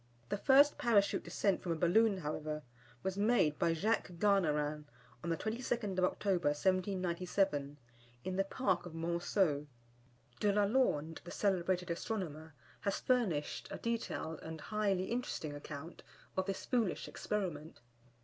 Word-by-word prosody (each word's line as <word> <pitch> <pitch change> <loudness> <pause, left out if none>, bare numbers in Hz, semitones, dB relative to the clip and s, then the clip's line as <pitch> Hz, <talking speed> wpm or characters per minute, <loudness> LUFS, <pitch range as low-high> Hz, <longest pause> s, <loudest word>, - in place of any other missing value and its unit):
The - - 0
first 280 +4 +6
Parachute 205 -4 +3
descent 200 -2 0
from 175 -2 -1
a - - -2
balloon, 195 +6 +4
however, 155 -2 -3 0.4
was 190 +1 -2
made 205 -9 +3
by 165 - +3
Jacques 205 +1 0
Garnerin, 155 -6 +1 0.4
on 170 - -2
the 165 - +1
22nd 220 -2 -2
of 180 - +5
October, 185 -3 0
1797, 180 -2 0 0.5
in 185 - -3
the 195 - +2
Park 190 -4 0
of 170 - -10
Monceau. 165 -2 +1 0.7
De 205 - +3
la 205 +1 +3
Lande, 180 - +1
the 175 - -9
celebrated 180 -3 0
astronomer, 160 -5 -4 0.2
has 200 - -1
furnished 210 - 0
a - - -5
detailed 225 -8 -3
and 160 0 -7
highly 200 -1 0
interesting 230 -10 -3
account 145 +3 -8 0.3
of 190 0 0
this 195 -1 -3
foolish 230 -7 0
experiment. 170 -7 -3
185 Hz, 140 wpm, -35 LUFS, 160-205 Hz, 0.7 s, first